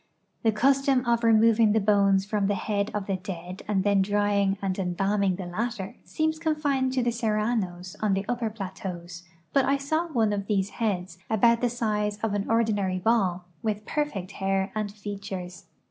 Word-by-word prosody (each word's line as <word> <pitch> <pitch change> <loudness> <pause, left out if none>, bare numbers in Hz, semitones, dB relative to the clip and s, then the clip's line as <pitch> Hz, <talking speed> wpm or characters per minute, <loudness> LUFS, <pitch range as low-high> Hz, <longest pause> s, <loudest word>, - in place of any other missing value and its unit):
The 225 - +3
custom 270 +3 +3
of 235 0 +1
removing 225 -1 +5
the 220 - +4
bones 200 -2 +3
from 205 -1 0
the 205 - +1
head 200 +1 -1
of 210 -2 -3
the 195 -1 -1
dead 180 0 -7
and 200 -3 +1
then 200 -1 +3
drying 200 0 +1
and 195 -1 -2
em 180 -2 -1
balming 195 0 +1
the 190 - -5
latter 195 +2 -3
seems 315 0 -1
confined 290 -5 0
to 255 -2 +1
the 240 - +1
Serranos 215 -5 -1
on 210 -3 +1
the 195 +1 -2
upper 240 -1 -1
plateaus, 185 -4 -7 0.3
but 275 - +4
I 275 +1 +2
saw 315 +5 -1
one 225 -9 +1
of 200 -1 -3
these 200 -2 0
heads, 185 -6 -2
about 230 +2 +4
the 245 - +2
size 210 -3 -1
of 220 -2 0
an 205 0 -1
ordi 225 -1 +2
nary 190 -2 -1
ball, 185 -3 +1 0.2
with 210 -1 -2
perfect 225 - -2
hair 195 0 -1
and 215 -2 -2
features. 200 -3 -7
205 Hz, 185 wpm, -26 LUFS, 195-230 Hz, 0.3 s, removing